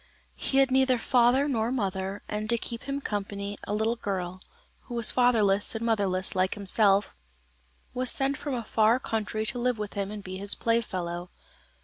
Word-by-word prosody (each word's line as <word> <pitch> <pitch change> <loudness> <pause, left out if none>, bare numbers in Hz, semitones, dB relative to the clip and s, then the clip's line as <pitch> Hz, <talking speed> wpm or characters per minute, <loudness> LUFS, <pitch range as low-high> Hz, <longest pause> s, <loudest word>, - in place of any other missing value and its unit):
He 270 - -1
had 270 -1 +4
neither 260 -1 +4
father 245 +3 +3
nor 230 -4 0
mother, 195 -4 -2
and 215 0 -4
to 235 - +3
keep 230 0 -6
him 280 +1 -3
company, 200 -2 -4
a - - -3
little 220 +2 +1
girl, 185 -4 -4 0.4
who 240 - -7
was 235 -2 +4
fatherless 220 -5 +2
and 225 +1 -3
motherless 195 -5 0
like 185 +2 +1
himself, 200 - +3 0.8
was 255 0 0
sent 275 +1 +2
from 285 -1 -4
a 235 - -3
far 220 +3 +3
country 215 -2 -2
to 245 +3 0
live 250 -1 +1
with 210 -1 -5
him 200 -1 -3
and 210 -1 -7
be 185 0 -6
his 200 +1 -3
playfellow. 180 -7 -2
220 Hz, 180 wpm, -27 LUFS, 200-245 Hz, 0.8 s, had